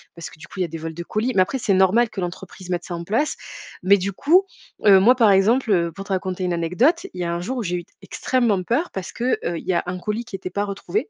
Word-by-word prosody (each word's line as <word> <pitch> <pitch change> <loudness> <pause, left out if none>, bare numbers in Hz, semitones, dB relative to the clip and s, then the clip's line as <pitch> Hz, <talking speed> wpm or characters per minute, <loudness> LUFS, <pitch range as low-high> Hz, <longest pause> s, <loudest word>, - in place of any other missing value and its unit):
parce 170 - -8
que, - - -17
du 150 - -11
coup, 190 - -10
il - - +1
y - - 0
a - - -5
des 165 +1 -7
vols 160 0 -6
de 170 +1 -6
colis, 225 +7 -1
mais, 185 - +5
après 200 +9 0
c'est 205 -4 +1
normal 195 +5 +4
que 190 - -6
l'entreprise 185 +1 -7
mette 175 -1 -1
ça 175 - -5
en 170 - -5
place, 230 - 0 0.5
mais, 200 +2 +6
du 195 +2 -2
coup, 355 - +4 0.4
heu, 195 -2 +8
moi, 245 +6 +5
par 225 -5 +5
exemple, 220 +5 +3
heu, 170 -3 +2
pour 195 +2 -9
te 195 - -3
raconter 185 0 -2
une 180 -1 0
anecdote, 180 - +1
il 180 - -6
y - - 0
a 170 - -1
un 170 - -3
jour 255 +8 -4
où 235 - -2
j'ai 180 -1 -2
eu 175 - -6 0.2
extrêmement 235 -7 0
peur 265 - 0
parce 190 -1 -5
que, 250 +2 0
heu, 170 -1 -1
il - - -13
y 185 - +2
a - - +1
un 180 +1 -4
colis 215 +5 -3
qui 215 - -7
était 185 -1 -6
pas 205 +3 -2
retrouvé 300 - -3
190 Hz, 305 wpm, -22 LUFS, 180-230 Hz, 0.5 s, heu